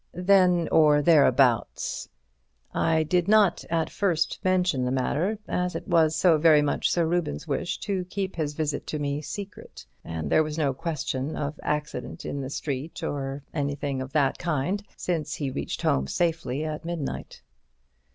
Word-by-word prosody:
"Then 180 Hz, -2 st, +4 dB
or 150 Hz, -2 st, +5 dB
thereabouts. 140 Hz, -7 st, +3 dB, 0.6 s
I 160 Hz, -1 st, +2 dB
did 175 Hz, +3 st, +1 dB
not 210 Hz, -2 st, +4 dB
at 165 Hz, -1 st, 0 dB
first 175 Hz, -6 st, 0 dB
mention 180 Hz, -7 st, +2 dB
the 125 Hz, -, 0 dB
matter 150 Hz, +11 st, 0 dB
as 180 Hz, 0 st, -1 dB
it -, -, -5 dB
was 160 Hz, -4 st, +3 dB
so 170 Hz, -4 st, +4 dB
very 155 Hz, -2 st, +6 dB
much 145 Hz, -, 0 dB
Sir 170 Hz, -1 st, +2 dB
Reuben's 165 Hz, -, -1 dB
wish -, -, -2 dB
to 190 Hz, -2 st, -1 dB
keep 190 Hz, +1 st, -4 dB
his 150 Hz, -3 st, -2 dB
visit 150 Hz, -2 st, -2 dB
to 155 Hz, -, -3 dB
me 145 Hz, 0 st, -2 dB
secret, 200 Hz, +5 st, -8 dB, 0.2 s
and 80 Hz, -2 st, -5 dB
there -, -, +5 dB
was 155 Hz, 0 st, -3 dB
no 145 Hz, -4 st, +1 dB
question 150 Hz, -2 st, -3 dB
of 145 Hz, +2 st, -4 dB
accident 150 Hz, 0 st, -3 dB
in 140 Hz, -, -3 dB
the 130 Hz, -, -5 dB
street 140 Hz, +2 st, -4 dB
or 135 Hz, 0 st, -3 dB
anything 145 Hz, -2 st, -2 dB
of 130 Hz, +1 st, -6 dB
that 145 Hz, -4 st, +2 dB
kind, 175 Hz, +4 st, -1 dB, 0.2 s
since 160 Hz, -4 st, -2 dB
he 140 Hz, -3 st, -3 dB
reached -, -, -4 dB
home 65 Hz, 0 st, +2 dB
safely 160 Hz, -, -1 dB
at 155 Hz, -1 st, -4 dB
midnight." 165 Hz, -, -5 dB
155 Hz, 160 wpm, -26 LUFS, 140-175 Hz, 0.6 s, very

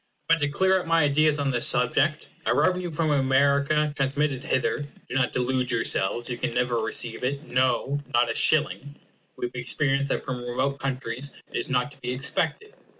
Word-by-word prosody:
But 165 Hz, 0 st, +4 dB
to 145 Hz, -1 st, 0 dB
clear 190 Hz, +5 st, +2 dB
up 180 Hz, -, -7 dB
my 165 Hz, -1 st, +3 dB
ideas 150 Hz, +1 st, +3 dB
on 140 Hz, -2 st, 0 dB
this 120 Hz, -2 st, +2 dB
subject: 145 Hz, +5 st, +1 dB, 0.2 s
a -, -, +3 dB
revenue 180 Hz, -1 st, +1 dB
from 155 Hz, -1 st, -1 dB
America 140 Hz, +2 st, +2 dB
transmitted 140 Hz, 0 st, -1 dB
hither 135 Hz, +2 st, -1 dB, 0.2 s
do -, -, -6 dB
not 130 Hz, -2 st, +1 dB
delude 125 Hz, 0 st, -1 dB
yourselves 115 Hz, 0 st, +1 dB
you 120 Hz, -, -4 dB
never 125 Hz, 0 st, -1 dB
can 115 Hz, -, -1 dB
receive 115 Hz, +1 st, 0 dB
it; 140 Hz, +3 st, -2 dB
no, 130 Hz, +1 st, 0 dB
not 120 Hz, -1 st, +2 dB
a -, -, -2 dB
shilling. 145 Hz, 0 st, +2 dB, 0.4 s
We -, -, -3 dB
have 120 Hz, -, -5 dB
experience 135 Hz, +3 st, 0 dB
that -, -, -2 dB
from 125 Hz, -2 st, -4 dB
remote 130 Hz, +3 st, -2 dB
countries 135 Hz, 0 st, -4 dB, 0.2 s
it -, -, -9 dB
is -, -, -2 dB
not 130 Hz, +2 st, 0 dB
to 140 Hz, -, -17 dB
be 125 Hz, +1 st, -3 dB
expected. 285 Hz, -, -1 dB
135 Hz, 190 wpm, -25 LUFS, 125-150 Hz, 0.4 s, But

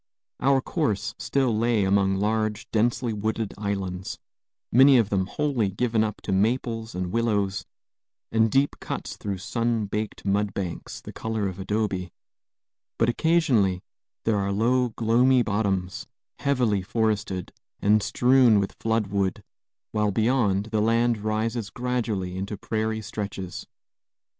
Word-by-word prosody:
Our 135 Hz, 0 st, +3 dB
course 110 Hz, -, -1 dB
still 130 Hz, -1 st, +1 dB
lay 115 Hz, -1 st, +2 dB
among 95 Hz, 0 st, +2 dB
large, 110 Hz, +1 st, -1 dB
densely 115 Hz, +1 st, +1 dB
wooded 110 Hz, +1 st, -2 dB
islands, 95 Hz, -3 st, -3 dB, 0.5 s
many 135 Hz, +2 st, +7 dB
of 110 Hz, -4 st, +2 dB
them 95 Hz, -2 st, +1 dB
wholly 135 Hz, -6 st, 0 dB
given 110 Hz, +2 st, +1 dB
up 105 Hz, -1 st, -4 dB
to -, -, -3 dB
maples 115 Hz, +2 st, 0 dB
and 90 Hz, -1 st, -3 dB
willows, 105 Hz, -4 st, 0 dB, 0.6 s
and 110 Hz, 0 st, +3 dB
deep 135 Hz, +4 st, +2 dB
cuts -, -, -5 dB
through 100 Hz, -2 st, -4 dB
sun 115 Hz, +3 st, -1 dB
baked 105 Hz, +1 st, -4 dB
mudbanks, 100 Hz, -3 st, -2 dB
the -, -, -9 dB
color 110 Hz, -2 st, -2 dB
of 95 Hz, 0 st, -6 dB
adobe; 95 Hz, -3 st, -2 dB, 0.9 s
but 115 Hz, -, +3 dB
occasionally 120 Hz, -, +2 dB, 0.4 s
there 110 Hz, -2 st, +2 dB
are 100 Hz, 0 st, -1 dB
low, 120 Hz, +5 st, +2 dB
gloomy 120 Hz, +3 st, +3 dB
bottoms, 100 Hz, -4 st, -1 dB, 0.3 s
heavily 125 Hz, -8 st, +1 dB
forested, 105 Hz, -2 st, -1 dB, 0.3 s
and 105 Hz, +1 st, +4 dB
strewn 125 Hz, -1 st, +4 dB
with 100 Hz, -, -2 dB
flood 110 Hz, -1 st, +1 dB
wood, 100 Hz, -1 st, -1 dB, 0.5 s
while 105 Hz, -1 st, +1 dB
beyond 110 Hz, -2 st, +1 dB
the 110 Hz, -1 st, +1 dB
land 115 Hz, +1 st, +2 dB
rises 110 Hz, +1 st, -2 dB
gradually 115 Hz, -7 st, -2 dB
into 100 Hz, +2 st, -4 dB
prairie 110 Hz, +1 st, -2 dB
stretches. 100 Hz, -4 st, -5 dB
110 Hz, 130 wpm, -25 LUFS, 100-115 Hz, 0.9 s, many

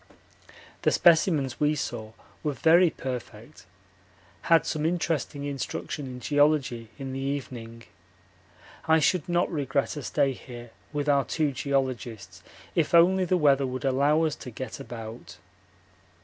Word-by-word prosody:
The -, -, +3 dB
specimens 160 Hz, -6 st, +3 dB
we 150 Hz, 0 st, +2 dB
saw 110 Hz, -6 st, -5 dB, 0.3 s
were 150 Hz, -, -1 dB
very 170 Hz, +5 st, +5 dB
perfect. 115 Hz, -, -8 dB, 0.8 s
Had 165 Hz, -1 st, +5 dB
some 155 Hz, -1 st, -2 dB
interesting 160 Hz, -3 st, -1 dB
instruction 145 Hz, 0 st, -4 dB
in 125 Hz, -1 st, -7 dB
geology 145 Hz, -5 st, +1 dB
in 135 Hz, -2 st, -6 dB
the 135 Hz, -, -4 dB
evening. 125 Hz, -4 st, -5 dB, 1.0 s
I 160 Hz, 0 st, +5 dB
should 160 Hz, +2 st, +1 dB
not 175 Hz, +1 st, +1 dB
regret 140 Hz, -3 st, -1 dB
a 145 Hz, -, -5 dB
stay 140 Hz, +1 st, +1 dB
here 120 Hz, -2 st, -11 dB, 0.2 s
with 145 Hz, 0 st, -2 dB
our 140 Hz, -1 st, +4 dB
two 150 Hz, +4 st, 0 dB
geologists 120 Hz, -9 st, -3 dB, 0.3 s
if 165 Hz, 0 st, +1 dB
only 185 Hz, +2 st, +5 dB
the 180 Hz, +1 st, +2 dB
weather 140 Hz, -4 st, +3 dB
would 130 Hz, +1 st, -5 dB
allow 140 Hz, +4 st, +3 dB
us 155 Hz, -2 st, 0 dB
to 130 Hz, -, -8 dB
get 125 Hz, +2 st, -7 dB
about. 115 Hz, -3 st, -9 dB
140 Hz, 135 wpm, -27 LUFS, 125-155 Hz, 1.0 s, very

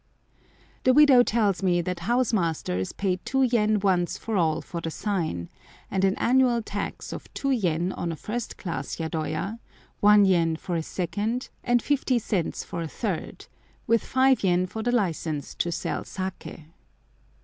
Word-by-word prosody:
The 255 Hz, 0 st, +4 dB
widow 285 Hz, -4 st, +8 dB
tells 210 Hz, -5 st, +1 dB
me 180 Hz, -2 st, +2 dB
that 180 Hz, 0 st, -3 dB
house 240 Hz, +6 st, +1 dB
masters 160 Hz, -, -1 dB
pay 190 Hz, -2 st, -1 dB
2 265 Hz, +8 st, 0 dB
yen 215 Hz, -4 st, +2 dB
once 180 Hz, -3 st, +1 dB
for 225 Hz, -, -4 dB
all 160 Hz, -4 st, +2 dB
for 170 Hz, -, -6 dB
the 165 Hz, -, -3 dB
sign, 160 Hz, -, -2 dB, 0.4 s
and 190 Hz, -1 st, 0 dB
an 195 Hz, 0 st, +3 dB
annual 245 Hz, -2 st, +3 dB
tax 205 Hz, -1 st, -5 dB
of -, -, -9 dB
2 275 Hz, -, 0 dB
yen 180 Hz, -7 st, +1 dB
on 170 Hz, -2 st, -3 dB
a -, -, -4 dB
first 230 Hz, +8 st, -5 dB
class 155 Hz, -7 st, -4 dB
yadoya, 160 Hz, +6 st, -3 dB, 0.4 s
1 205 Hz, 0 st, +6 dB
yen 170 Hz, -4 st, +3 dB
for 175 Hz, +2 st, -4 dB
a 165 Hz, -, 0 dB
second, 205 Hz, +9 st, -3 dB
and 240 Hz, -1 st, +2 dB
50 270 Hz, -3 st, +1 dB
cents 200 Hz, -6 st, -2 dB
for 170 Hz, -, -5 dB
a 165 Hz, -, -3 dB
third, 190 Hz, 0 st, -4 dB, 0.4 s
with 230 Hz, -2 st, +2 dB
5 260 Hz, -1 st, +3 dB
yen 180 Hz, -1 st, +3 dB
for 220 Hz, +4 st, -6 dB
the 240 Hz, +2 st, 0 dB
license 165 Hz, -, -1 dB
to 170 Hz, -, -1 dB
sell -, -, -2 dB
saké. 185 Hz, -4 st, -6 dB
195 Hz, 165 wpm, -26 LUFS, 170-235 Hz, 0.4 s, widow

